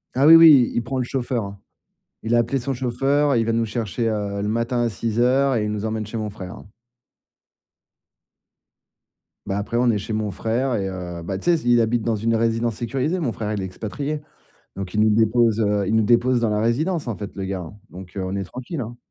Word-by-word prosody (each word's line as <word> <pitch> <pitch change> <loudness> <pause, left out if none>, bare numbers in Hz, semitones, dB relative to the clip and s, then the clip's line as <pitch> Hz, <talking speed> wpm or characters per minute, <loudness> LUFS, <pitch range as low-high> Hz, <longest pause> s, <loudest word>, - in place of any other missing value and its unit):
Ah 135 +2 +3
oui, 165 +1 +10
oui, 155 -7 +8
il 120 - 0
prend 130 +3 -4
le 125 - 0
chauffeur, 120 -2 -2
hein. 100 0 -8 0.6
Il 115 +1 0
a - - +5
appelé 120 +4 +1
son 135 +2 -3
chauffeur, 135 +3 +1
il 115 - +2
va 115 - +1
nous 115 0 +1
chercher, 115 +1 -2
heu, 100 -2 -2
le 105 - -1
matin 115 +2 0
à 120 - +1
06:00 125 +6 +1
et 110 -2 0
il 105 - -2
nous 105 0 -3
emmène 110 -1 -2
chez 115 - -7
mon 105 -1 -3
frère, 95 -3 -8
hein. - - -13 2.8
Bah, 95 - -2
après, 110 +3 -2
on 125 0 +3
est 105 - 0
chez 105 +2 -6
mon 105 -1 -1
frère 120 +6 -1
et 95 -2 -1
heu, 90 -2 -6
bah, 95 +2 -3
tu - - -10
sais, 175 - +4
s 160 - -1
il 120 -1 +4
habite 115 +1 +1
dans 115 -1 0
une 115 +2 0
résidence 115 0 0
sécurisée, 135 +9 -2
mon 130 -8 -1
frère, 110 -1 -4
il 100 - -2
est - - -3
expatrié. 140 +11 -5 0.6
Donc 95 -1 -6
il 105 - +2
nous 110 0 +4
dépose, 115 +1 +3
heu, 105 -1 +1
il 110 - 0
nous 110 - +4
dépose 120 +2 +3
dans 115 - +1
la 105 0 0
résidence, 145 +6 0
en 110 - -3
fait, 100 -2 -6
le 95 - -4
gars, 95 -1 -3
hein. 90 +4 -9
Donc, 90 +1 -11
heu, 95 - -2
on 95 +1 -4
est 95 - -2
tranquilles, 130 - -6
hein. 120 +1 -6
115 Hz, 240 wpm, -22 LUFS, 105-125 Hz, 2.8 s, oui